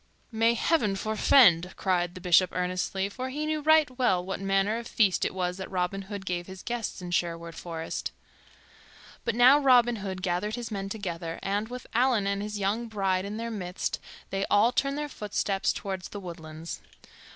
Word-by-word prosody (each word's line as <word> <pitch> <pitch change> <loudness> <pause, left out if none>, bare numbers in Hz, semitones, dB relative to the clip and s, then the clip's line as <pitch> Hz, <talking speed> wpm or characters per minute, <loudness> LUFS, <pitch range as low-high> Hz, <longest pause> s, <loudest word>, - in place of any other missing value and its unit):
"May 230 +1 +3
Heaven 230 -7 +2
forfend!" 195 -4 +4
cried 175 -2 0
the 185 - -8
Bishop 180 0 +5
earnestly; 185 +2 -1
for 255 +6 -5
he 295 +4 -3
knew 310 0 -1
right 315 0 +5
well 185 -8 +2
what 195 - -4
manner 195 +3 +1
of 235 - -8
feast 205 -7 +2
it - - 0
was 180 -1 -2
that 190 - -6
Robin 185 +1 -1
Hood 195 0 -7
gave 175 -1 -3
his 190 0 -10
guests 235 -5 -4
in 175 - -6
Sherwood 170 -1 -1
Forest. 165 -1 -5 1.1
But 225 - 0
now 255 +4 +7
Robin 245 -4 +5
Hood 190 -2 -5
gathered 190 +4 -1
his 240 -2 -6
men 195 -1 -3
together, 170 -5 -4
and, 205 +2 -1
with 250 +1 -7
Allan 240 -3 +3
and 200 0 -1
his 210 0 -4
young 205 +4 -1
bride 195 -3 0
in 205 +2 -5
their 230 +1 -4
midst, 185 -4 -3 0.3
they 195 0 -1
all 210 +4 +5
turned 275 +2 0
their 295 0 -2
footsteps 205 -5 -1
toward 190 -2 -4
the 205 - -7
woodlands. 165 -3 -8
195 Hz, 185 wpm, -28 LUFS, 180-230 Hz, 1.1 s, now